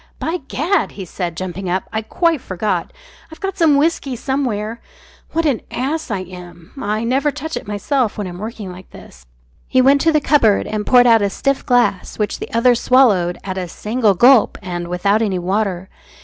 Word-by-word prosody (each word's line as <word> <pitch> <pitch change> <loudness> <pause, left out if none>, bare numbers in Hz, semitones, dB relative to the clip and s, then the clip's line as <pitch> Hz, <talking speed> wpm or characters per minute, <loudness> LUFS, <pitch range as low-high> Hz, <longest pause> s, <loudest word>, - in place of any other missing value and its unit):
"By 330 +3 -2
Gad!" 345 +9 0
he 195 - -7
said, 175 -1 -5
jumping 185 0 -5
up, 185 +2 0
"I 220 - -1
quite 325 +6 0
forgot. 190 +3 -2 0.4
I've 320 - -12
got 390 -1 -3
some 325 -6 +4
whisky 285 -3 0
somewhere. 235 -4 -2 0.5
What 330 0 0
an 275 -7 +1
ass 295 +5 -3
I 200 -4 -2
am. 175 -2 -12
I 215 0 -1
never 265 +5 +1
touch 305 +2 -5
it 250 - -6
myself 220 +3 -1
when 205 - -3
I'm 175 -1 -7
working 215 -2 -6
like 180 +1 -12
this." 65 -1 -15 0.4
He 260 - +2
went 275 +2 +5
to 325 - +3
the 305 - +3
cupboard 255 -9 +3
and 210 0 -4
poured 245 -1 +6
out 230 -2 +5
a 200 - +1
stiff 275 +7 -1
glass 245 -6 +1
which 210 -1 -2
the - - -7
other 240 +2 +4
swallowed 225 -8 +3
at 190 -1 -4
a 180 - -4
single 215 +3 0
gulp 245 +4 +5
and 175 -1 -4
without 200 +5 +1
any 200 -4 0
water. 190 0 -1
220 Hz, 190 wpm, -18 LUFS, 185-270 Hz, 0.5 s, poured